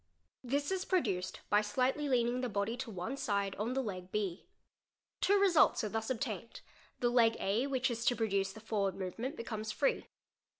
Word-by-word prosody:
This 285 +6 -1
is 380 -1 0
produced 205 - 0
by 210 - +5
slightly 260 +7 0
lear 245 -3 +3
ing 245 +1 -1
the 250 - -1
body 205 +2 -1
to 255 -1 -5
one 190 +5 -4
side 200 -6 -1
on 220 +5 -1
the 265 0 0
leg 185 -4 -6
B. 200 -4 -2 0.7
Two 405 +1 +4
results 360 -10 +5
are 215 - -1
thus 220 +2 -2
obtained; 230 -4 -4 0.4
he - - -1
leg 235 -2 +4
A 215 +7 +1
which 260 -2 +1
is 230 -1 -3
to 245 - +4
produce 200 -4 0
the 220 - -11
forward 205 -3 -1
movement 225 - -4
becomes 220 -2 -4
free. 275 - 0
225 Hz, 185 wpm, -34 LUFS, 200-260 Hz, 0.7 s, by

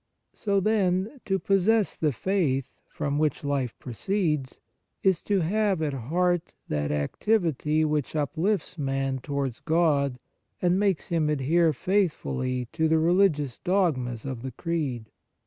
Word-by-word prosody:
So, 200 -2 0
then, 195 +3 +1
to 195 -1 +1
possess 195 +3 +2
the 155 -2 +1
faith, 140 - 0
from 145 0 -2
which 155 -1 0
life 140 -4 -1
proceeds, 150 - -2 0.4
is 190 -3 +3
to 200 -3 +1
have 200 +2 +1
at 145 -2 -1
heart 175 +7 0 0.2
that 75 -1 -1
activity 155 - +1
which 150 -1 -1
uplifts 165 +4 -1
man 135 -1 -1
towards 140 -3 -3
God 150 -5 +2 0.4
and 180 +1 +2
makes 195 -5 0
him 160 -3 +1
adhere 155 +4 +3
faithfully 135 -7 -1
to 160 - +1
the 160 0 +3
religious 160 -6 +2
dogmas 140 - 0
of 130 -4 -4
the 130 -1 -6
Creed. 140 -9 -3
155 Hz, 130 wpm, -26 LUFS, 135-185 Hz, 0.4 s, is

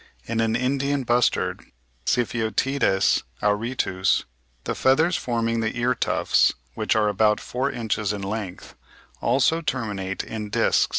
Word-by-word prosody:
In 115 - -2
an 115 0 +1
Indian 140 +3 0
bustard 120 -6 +1 0.5
(Sypheotides 115 -1 +1 0.2
auritus) 105 -3 +1 0.4
the - - -2
feathers 160 +7 +3
forming 115 -3 -1
the 115 +1 -2
ear 120 +1 +2
tufts, - - +2 0.2
which - - 0
are 110 -1 +3
about 105 +1 +3
four 130 +3 -2
inches 110 -5 -2
in 100 -2 -4
length, 100 -2 -5 0.5
also 135 +7 +2
terminate 105 - -3
in 105 -2 -6
discs. - - +2
115 Hz, 125 wpm, -24 LUFS, 105-125 Hz, 0.5 s, feathers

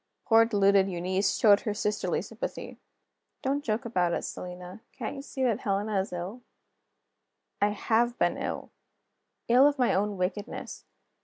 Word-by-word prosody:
Poor 225 0 +6
deluded 200 -3 +3
Eunice 185 +2 0
showed 205 -2 +6
her 210 -2 -3
sisterly 210 0 -1
sympathy: - - -6 0.6
"Don't 280 +2 0
joke 220 -1 -1
about 180 -7 +1
it, - - -2
Selina: 180 +3 -7
can't 250 +1 -5
you 275 - -6
see 270 -1 -4
that 235 -5 +1
Helena 200 0 0
is 190 - -3
ill?" 180 +7 -5 1.2
I 205 - +4
have 235 +3 +1
been - - +2
ill; - - -5 0.8
ill 250 +4 +6
of 290 0 +1
my 250 -2 +2
own 205 +1 0
wickedness. 185 +3 -4
210 Hz, 150 wpm, -28 LUFS, 190-235 Hz, 1.2 s, Poor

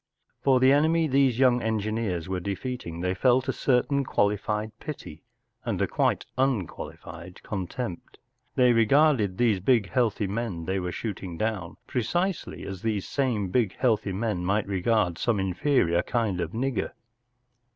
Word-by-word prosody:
For 130 -2 +4
the 130 +1 +5
enemy 160 +3 +3
these 135 -3 +3
young 125 -2 +4
engineers 110 -5 -1
were 95 -1 -2
defeating 100 -2 -5
they 90 +1 0
felt 130 +6 +2
a 130 - 0
certain 140 +2 +1
qualified 105 -1 0
pity 105 - -8 0.4
and - - -2
a - - +3
quite - - 0
unqualified 90 -7 -3
contempt. 95 0 -5 0.4
They 125 -2 +5
regarded 115 -4 +3
these 115 -5 +3
big, 105 -1 +2
healthy 115 -3 +1
men 100 -4 -3
they 95 +2 -1
were 90 -1 -3
shooting 95 -5 -5
down 105 -5 -3
precisely 175 - -2
as 95 -2 -6
these 110 -4 -1
same 120 -8 0
big, 110 0 +1
healthy 110 -6 +1
men 95 -2 -2
might 100 +3 +1
regard 95 -2 +1
^ome 115 -1 0
inferior 95 - +2
kind 110 -6 -1
of 85 - -2
nigger. 130 +3 -2
110 Hz, 145 wpm, -26 LUFS, 95-125 Hz, 0.4 s, the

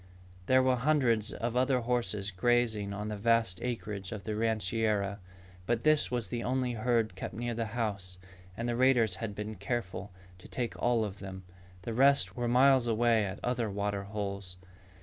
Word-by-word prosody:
There 130 0 +5
were 130 -1 +3
hundreds 125 -6 +2
of 120 +2 -3
other 130 0 +2
horses 115 -4 -1
grazing 110 0 +1
on 105 +1 -4
the 105 - -3
vast 115 -3 +2
acreage 105 -6 -4
of 105 -3 -6
the 110 +1 -3
rancheria. 110 -2 0 0.5
But 120 -1 0
this 155 -1 +4
was 120 -6 -2
the 120 -1 -3
only 125 0 0
herd 115 -2 +1
kept 95 - -6
near 120 +1 -2
the 115 -1 -2
house 100 -5 -3 0.4
and 115 - -2
the 120 - 0
raiders 120 -6 +3
had 105 -2 -5
been 105 +1 -5
careful 100 -2 -4 0.3
to - - -13
take 120 -2 -3
all 120 -2 +2
of 100 -1 -7
them. 95 -1 -8 0.4
The 115 - -4
rest 125 -6 +4
were 120 0 -1
miles 130 0 +5
away 115 -1 +3
at 95 -1 -4
other 120 -3 0
water 100 0 -2
holes. 100 -3 -5
115 Hz, 175 wpm, -31 LUFS, 100-120 Hz, 0.5 s, There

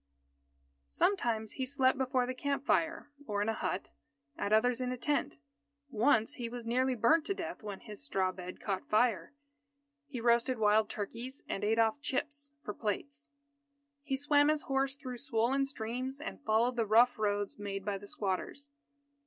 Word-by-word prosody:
Sometimes 230 - +1
he 260 - -3
slept 265 -1 +3
before 260 -1 +1
the 255 - -3
camp 280 +1 -2
fire 320 -2 +1 0.2
or 205 -2 -1
in - - -3
a - - +1
hut, 190 -3 -3 0.4
at 200 - -2
others 240 +3 +3
in 250 0 -1
a 255 - -3
tent. 285 - -1 0.5
Once, 230 +2 +3
he 240 -2 -3
was 240 -1 -7
nearly 255 +2 +1
burnt 245 +8 +4
to 395 - -1
death 335 -2 -5
when 205 -3 -6
his 210 +4 -9
straw 190 -10 0
bed 185 0 -8
caught 195 -2 -3
fire. 220 -1 +2 0.8
He 270 -4 -5
roasted 235 +2 +3
wild 215 0 +3
turkeys, 235 +6 -5
and - - -3
ate 220 +2 +2
off 225 +5 +2
chips 285 +1 -3
for 210 - -4
plates. 280 +9 -4 0.7
He 275 -2 -2
swam 290 +1 +4
his 305 0 +2
horse 270 0 0
through 255 -4 -7
swollen 255 +2 +1
streams, 255 +2 -4
and 310 -1 -6
followed 235 +1 +2
the 230 -2 +1
rough 230 +3 +5
roads 205 -1 -1
made 195 -1 -4
by 200 -2 -1
the 205 - -11
squatters. 205 +9 -3
245 Hz, 170 wpm, -32 LUFS, 215-275 Hz, 0.8 s, rough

